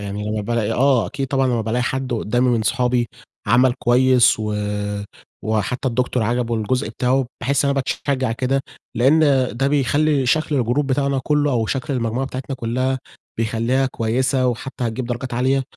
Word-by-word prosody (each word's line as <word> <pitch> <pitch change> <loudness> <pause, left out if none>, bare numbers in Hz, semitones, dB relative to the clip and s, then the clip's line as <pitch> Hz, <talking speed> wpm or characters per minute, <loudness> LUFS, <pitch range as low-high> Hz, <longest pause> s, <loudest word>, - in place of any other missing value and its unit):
يعني 100 +1 -4
لمّا 110 0 -1
بالاقي 115 +1 -1
آه، 130 -1 +3
أكيد 140 -1 -4
طبعًا 135 0 +1
لمّا 120 -2 +1
بالاقي 115 +3 -1
حد 130 0 -2
قدامي 120 +3 +1
من 115 -3 +2
صحابي 125 0 +1 0.4
عمل 125 +1 +4
كويس 125 0 +4
و 105 -1 -2 0.9
وحتى 110 +5 -1
الدكتور 125 0 0
عجبه 120 +1 0
الجزء 125 +5 -1
بتاعه، 130 +1 0
باحس 140 +3 +1
إن 140 - +2
أنا - - +1
باتشجع 130 -2 -1
كده 130 +3 0 0.3
لأن 135 +7 +4 0.4
ده 135 +2 +1
بيخلّي 145 0 +2
شكل 155 +3 +1
الجروب 125 +4 +1
بتاعنا 140 0 0
كلّه 150 -1 +2
أو 115 -4 0
شكل 140 +5 -2
المجموعة 120 +2 -1
بتاعتنا 130 0 -5
كلّها 130 +2 -1 0.4
بيخلّيها 115 +4 +1
كويسة 130 +2 0
وحتى 125 +1 -3
هتجيب 120 +2 -3
درجات 120 +1 -4
عالية، 130 +2 +1
125 Hz, 165 wpm, -20 LUFS, 115-135 Hz, 0.9 s, عمل